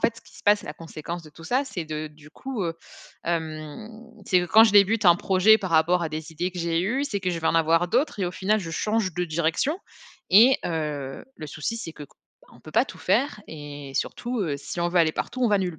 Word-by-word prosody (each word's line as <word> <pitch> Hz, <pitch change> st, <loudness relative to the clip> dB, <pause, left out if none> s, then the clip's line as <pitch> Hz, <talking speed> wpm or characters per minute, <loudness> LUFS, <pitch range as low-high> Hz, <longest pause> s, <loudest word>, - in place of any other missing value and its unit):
fait, 230 Hz, -, +1 dB
ce -, -, -12 dB
qui -, -, -18 dB
se -, -, -14 dB
passe, 205 Hz, 0 st, +4 dB
la 150 Hz, -, -6 dB
conséquence 165 Hz, +1 st, -7 dB
de 155 Hz, -, -14 dB
tout 165 Hz, +2 st, -14 dB
ça, 255 Hz, -, +1 dB
c'est 180 Hz, -11 st, -5 dB
de 155 Hz, 0 st, -5 dB
du 150 Hz, 0 st, -17 dB
coup, 260 Hz, +4 st, -5 dB
heu, 165 Hz, -1 st, -2 dB, 0.5 s
hem, 160 Hz, +2 st, -4 dB, 0.4 s
c'est 180 Hz, -, +4 dB
que 175 Hz, -, -3 dB
quand 220 Hz, +6 st, +7 dB
je 220 Hz, -, +2 dB
débute 205 Hz, +2 st, +5 dB
un 175 Hz, -2 st, +8 dB
projet, 195 Hz, +4 st, +4 dB
par 190 Hz, -4 st, -5 dB
rapport 165 Hz, +2 st, +3 dB
à 165 Hz, -, -1 dB
des 155 Hz, +1 st, -6 dB
idées 175 Hz, +4 st, -2 dB
que 180 Hz, -, -7 dB
j'ai 165 Hz, 0 st, 0 dB
eues, 240 Hz, +10 st, 0 dB
c'est 205 Hz, -8 st, -3 dB
que 185 Hz, -1 st, -1 dB
je 170 Hz, -, -3 dB
vais 160 Hz, -, -1 dB
en -, -, +1 dB
avoir 165 Hz, +2 st, +3 dB
d'autres 260 Hz, -, 0 dB
et 185 Hz, -, +1 dB
au 175 Hz, -, -4 dB
final, 210 Hz, +4 st, +1 dB
je 165 Hz, -, -6 dB
change 210 Hz, -1 st, -1 dB
de 180 Hz, 0 st, -1 dB
direction. 170 Hz, -, 0 dB, 0.5 s
Et, 235 Hz, +7 st, +7 dB
heu, 150 Hz, -5 st, -4 dB
le 155 Hz, -, -7 dB
souci, 160 Hz, +11 st, -4 dB
c'est 170 Hz, -8 st, -6 dB
qu 150 Hz, -, -11 dB
qu -, -, -19 dB, 0.3 s
bah -, -, -23 dB
on -, -, -18 dB
peut -, -, -12 dB
pas -, -, +4 dB
tout -, -, -11 dB
faire 275 Hz, -6 st, +1 dB
et 145 Hz, -2 st, -8 dB
surtout, 240 Hz, -, -2 dB
heu, 155 Hz, -7 st, -1 dB
si 145 Hz, +5 st, -6 dB
on 170 Hz, -, +1 dB
veut 175 Hz, +1 st, +1 dB
aller 160 Hz, -1 st, +3 dB
partout, 255 Hz, +9 st, -4 dB
on 240 Hz, -, +4 dB
va 205 Hz, -1 st, +3 dB
nulle 180 Hz, -4 st, -3 dB
175 Hz, 260 wpm, -25 LUFS, 160-210 Hz, 0.5 s, un